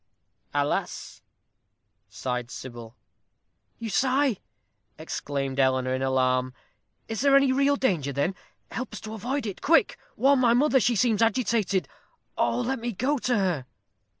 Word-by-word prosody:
"Alas!" 145 0 -2 0.9
sighed 125 -2 -4
Sybil. 120 -3 -9 0.8
"You 230 -2 -5
sigh!" 265 -2 +2 0.6
exclaimed 135 -1 -4
Eleanor, 130 -1 +2
in 130 - -2
alarm. 130 -1 +1 0.5
"Is 225 +1 -3
there 280 0 +5
any 275 -1 +5
real 280 +2 +3
danger, 175 - 0
then? 140 +7 0 0.4
Help 255 +2 -5
us - - -8
to 215 0 -7
avoid 245 +5 -3
it. 200 -4 -5
Quick, 330 +3 +3 0.2
warn 275 0 +4
my 240 -2 +4
mother; 275 +1 +4
she 245 0 +2
seems 225 0 +2
agitated. 220 -4 +1 0.5
Oh, - - +1
let 260 +1 -2
me 235 0 -3
go 265 +8 0
to 245 -1 +1
her." 180 -9 0
220 Hz, 140 wpm, -26 LUFS, -, 0.9 s, there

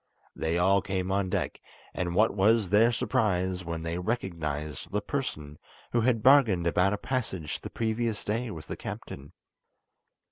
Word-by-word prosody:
They 80 +1 -1
all 95 +2 +4
came 95 -1 -2
on 95 -1 0
deck, - - -2 0.3
and 85 -1 -2
what 110 +3 +4
was 105 0 +3
their 110 +3 +5
surprise 95 -5 0
when 85 -1 -4
they 85 +1 -3
recognised 80 - -3
the 105 - +1
person 75 - -4 0.3
who 120 - +2
had 115 -2 +1
bargained 120 -11 +5
about 90 +4 +3
a - - -1
passage 100 - -3
the - - -6
previous 115 -1 -1
day 115 +3 -2
with 80 -6 -8
the - - -6
captain. 70 +1 -8
95 Hz, 155 wpm, -28 LUFS, 85-115 Hz, 0.3 s, their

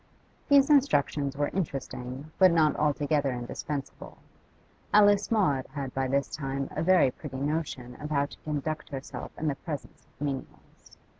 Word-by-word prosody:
These 280 0 +6
instructions 145 - +2
were 145 0 +1
interesting, 135 -4 -4
but 190 -1 +8
not 160 -3 +3
altogether 145 -1 +1
indispensable; 135 +3 -6 0.7
Alice 205 -1 +5
Maud 175 - +2
had 135 -3 -4
by 135 0 0
this 140 +1 +1
time 135 -2 -3
a - - -3
very 170 -6 +5
pretty 130 0 -8
notion 140 -4 -3
of 150 - -5
how 140 -2 +2
to - - -12
conduct 155 +1 -3
herself 135 -1 -6
in 160 - -2
the 145 - +2
presence 145 0 -8
of 145 - -6
menials. 135 -2 -7
145 Hz, 150 wpm, -28 LUFS, 135-160 Hz, 0.7 s, but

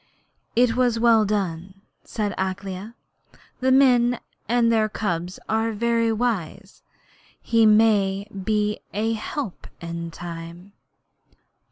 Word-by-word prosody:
'It 240 -1 +3
was 245 -2 +2
well 225 -2 +5
done,' 190 -3 -2 0.3
said 210 -3 -3
Akela. 190 +3 -4 0.7
'Men 250 -2 +4 0.3
and 235 -1 +3
their 220 -1 +2
cubs 180 -4 -3
are 225 +1 0
very 230 +1 +1
wise. 210 -4 -3 0.6
He 230 -1 +3
may 205 -2 +3
be 210 +1 -1 0.2
a 220 +2 0
help 225 0 -5
in 170 0 -5
time.' 170 +3 -9
215 Hz, 100 wpm, -23 LUFS, 190-230 Hz, 0.7 s, well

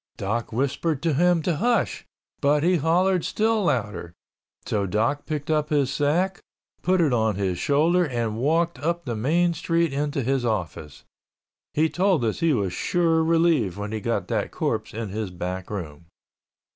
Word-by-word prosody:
Doc 110 +4 -2
whispered 140 +5 -1
to 165 -2 +2
him 175 +2 +3
to 170 -3 0
hush, 240 +4 0 0.3
but 145 +1 +3
he 180 +1 +3
hollered 175 +3 +2
still 220 -1 +1
louder, 105 - -2 0.5
so 100 -2 -1
Doc 115 +9 0
picked 150 0 -3
up 150 -1 +1
his 140 -3 +1
sack, 175 +7 +1 0.4
put 185 +1 +2
it 155 -6 +3
on 110 -3 +1
his 95 -3 -1
shoulder 165 +5 +2
and 120 -5 -2
walked 165 +3 +1
up 170 +3 -2
the 120 -3 -3
main 170 +10 +2
street 165 -1 0
into 145 0 -1
his 135 +1 0
office. 90 - -3 0.7
He 155 +2 +3
told 180 -6 +1
us 110 - -1
he 165 -1 +2
was 100 -9 0
sure 165 -2 +1
relieved 165 - +2
when 105 +1 -5
he 110 - -2
got 115 +3 -1
that - - -1
corpse - - -2
in 110 -1 -5
his 105 0 -3
back 90 +1 -5
room. 85 -5 -7
145 Hz, 170 wpm, -24 LUFS, 110-170 Hz, 0.7 s, him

